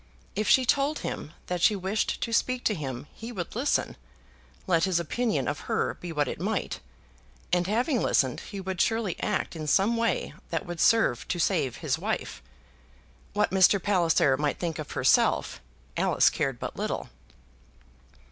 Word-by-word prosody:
If 215 +2 0
she 260 - +5
told 280 +4 +2
him 150 - -5
that 180 -1 -3
she 210 - +5
wished 195 +3 -1
to 230 - -2
speak 255 +1 +1
to 215 - +2
him, 135 -6 -5
he 230 +2 -8
would 180 -5 -5
listen, 260 +5 0 0.7
let 170 -2 +3
his 185 -3 +1
opinion 225 +7 -1
of - - -2
her - - +1
be 175 - -8
what 150 -3 0
it - - -5
might; - - -2 0.7
and 180 0 +2
having 240 +5 +1
listened 130 -3 +2
he 200 - -8
would 190 -1 -2
surely 225 -5 +1
act 210 -4 -2
in 155 -2 -5
some 200 +9 +3
way 230 -4 0 0.2
that 165 - -2
would 175 -1 -5
serve 225 - +3
to 180 - -1
save 155 - +1
his - - -2
wife. - - -3 0.9
What 210 - +1
Mr. 190 +1 +5
Palliser 170 -8 +3
might 145 0 -1
think 165 -3 -3
of 150 - -6
herself, - - +2 0.3
Alice - - +3
cared 135 -3 -1
but - - -5
little. - - -3
185 Hz, 165 wpm, -27 LUFS, 165-225 Hz, 0.9 s, she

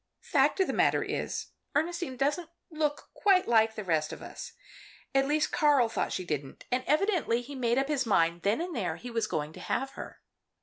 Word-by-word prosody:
Fact 290 +3 +2
of 380 - +4
the - - -2
matter - - +3
is, - - -3 0.2
Ernestine 325 -3 -1
doesn't 300 +5 0 0.2
look 300 -2 -2
quite 385 -3 +3
like 220 -1 +4
the 215 - -4
rest 160 -4 0
of - - -8
us. - - -8 0.6
At 270 0 +3
least 300 +1 +1
Karl 285 -6 +4
thought - - -1
she 185 - -3
didn't, 145 -4 -4
and 255 +1 +1
evidently 305 - +2
he 280 +4 -9
made 240 -2 0
up 270 0 +2
his 280 -5 0
mind 170 -4 +2
then 205 - +1
and 350 -2 -4
there 175 -7 -1
he 245 +6 -8
was 230 -1 0
going 155 -2 -3
to - - -11
have 270 0 -2
her. - - -9
260 Hz, 205 wpm, -29 LUFS, 215-300 Hz, 0.6 s, of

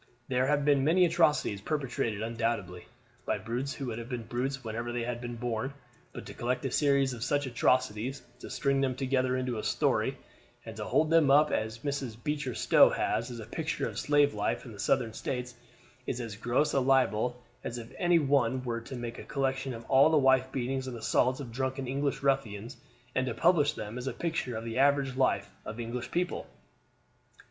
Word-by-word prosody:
There 130 0 +2
have 145 0 +2
been 140 -2 +4
many 175 +5 +5
atrocities 155 - +2
perpetrated 120 -6 -2
undoubtedly, 115 -6 -2 0.4
by 110 - -1
brutes 120 +7 -3
who 135 - -5
would 120 -2 -4
have 115 +1 -8
been 125 -3 -3
brutes 130 +4 -3
whenever 115 +1 -4
they 120 0 -2
had 120 0 -3
been 120 -1 -5
born; 120 +3 -3 0.4
but - - -8
to - - -8
collect 125 +2 -2
a 135 - -1
series 140 -2 +3
of 115 -1 -5
such 145 +2 +1
atrocities, 125 0 0 0.2
to - - -9
string 140 -1 +1
them 130 -2 0
together 130 -1 +1
into 125 -3 -2
a - - -5
story, - - +1 0.5
and - - -8
to - - -4
hold 160 0 +2
them 165 -4 +5
up, 150 +2 +5
as 110 +1 -1
Mrs. 140 -5 -2
Beecher 150 -5 -2
Stowe - - +6
has, 115 +3 -1
as 120 - -7
a 110 - -7
picture 160 +8 -2
of - - -5
slave 145 -1 +3
life - - -1
in 120 - -9
the 105 - -11
Southern 115 -4 +1
States, 125 +1 -4 0.5
is 125 - -2
as 115 -4 -5
gross 120 +7 +1
a 140 - +3
libel 125 -2 +2 0.2
as 120 - -4
if 115 0 -9
any 175 -1 +4
one 130 -4 +2
were 115 -2 -3
to 130 - -8
make 120 -1 -5
a - - -7
collection 135 -1 -1
of 115 -1 -7
all 135 +3 +6
the 160 - +4
wife 130 -1 +4
beatings 130 +1 -2
and 125 -2 -5
assaults 125 +4 +1
of 130 -5 -7
drunken 130 +2 -2
English 140 +2 -1
ruffians, 120 -4 0 0.4
and 130 0 0
to 115 - -2
publish 155 -4 +3
them 110 -1 -6
as 125 - -6
a - - -1
picture 160 -8 -2
of 110 - -5
the 115 +2 -3
average 140 -1 +3
life 130 - +1
of 110 +2 -7
English 120 +1 -4
people. 180 +1 -2
130 Hz, 205 wpm, -30 LUFS, 115-140 Hz, 0.5 s, Stowe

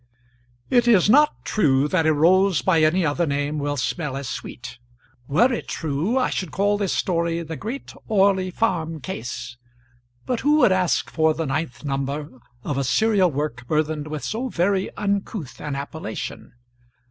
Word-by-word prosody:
It 245 -1 +4
is 210 -3 +5
not 295 +3 +4
true 140 -8 +2
that 165 0 +1
a 155 - +4
rose 185 +3 +4
by 170 -4 +3
any 165 +3 +3
other 160 +3 0
name 145 +1 -1
will 145 0 -2
smell 140 +1 -2
as 140 -2 -5
sweet. 120 +1 -7 0.5
Were 240 - +3
it 235 - -4
true, 160 - -1
I 260 - +1
should 185 - -2
call 205 +3 +1
this 200 -3 0
story 170 -1 0
"The 160 0 -6
Great 225 - -6
Orley 195 -3 +3
Farm 170 -6 -1
Case." 120 -1 -6 0.7
But 250 -2 -1
who 295 +2 +3
would 260 - +5
ask 185 -2 +1
for 160 -1 +2
the 165 +1 -2
ninth 135 -3 -3
number 140 0 -3 0.2
of 140 -2 -2
a - - 0
serial 200 - +3
work 135 -5 -4
burthened 155 0 -1
with 155 -1 -5
so 245 +4 -3
very 190 0 0
uncouth 200 - -3
an 145 -2 -4
appellation? 140 -4 -6
165 Hz, 165 wpm, -23 LUFS, 145-200 Hz, 0.7 s, is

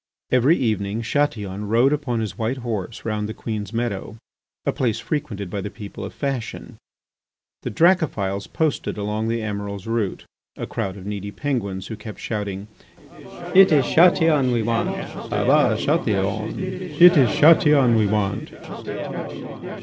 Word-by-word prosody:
Every 130 +6 +4
evening 110 -2 -1
Chatillon 105 -7 -1
rode 120 +6 +3
upon 130 -6 -1
his 110 - -4
white 115 +3 -2
horse 115 -4 -5
round 105 -1 -2
the 110 - -6
Queen's 110 -3 -5
Meadow, 115 -2 -3 0.5
a - - +2
place 120 -5 -1
frequented 115 - -4
by 100 -1 -3
the 105 - -5
people 105 -1 -9
of - - -6
fashion. 135 -5 -5 0.8
The - - -4
Dracophils 110 - +1
posted 155 -8 -1
along 105 +2 -2
the 115 0 -1
Emiral's 100 -2 -5
route 115 -4 -2 0.3
a - - -4
crowd 95 0 -4
of 95 - -10
needy 100 -1 -4
Penguins 100 -7 -3
who 110 - -6
kept 105 0 -9
shouting: 100 -2 -4 0.9
"It 190 -1 +7
is 145 -4 +4
Chatillon 160 -5 +4
we 120 -2 +1
want." 115 +1 0
110 Hz, 120 wpm, -22 LUFS, 100-130 Hz, 0.9 s, It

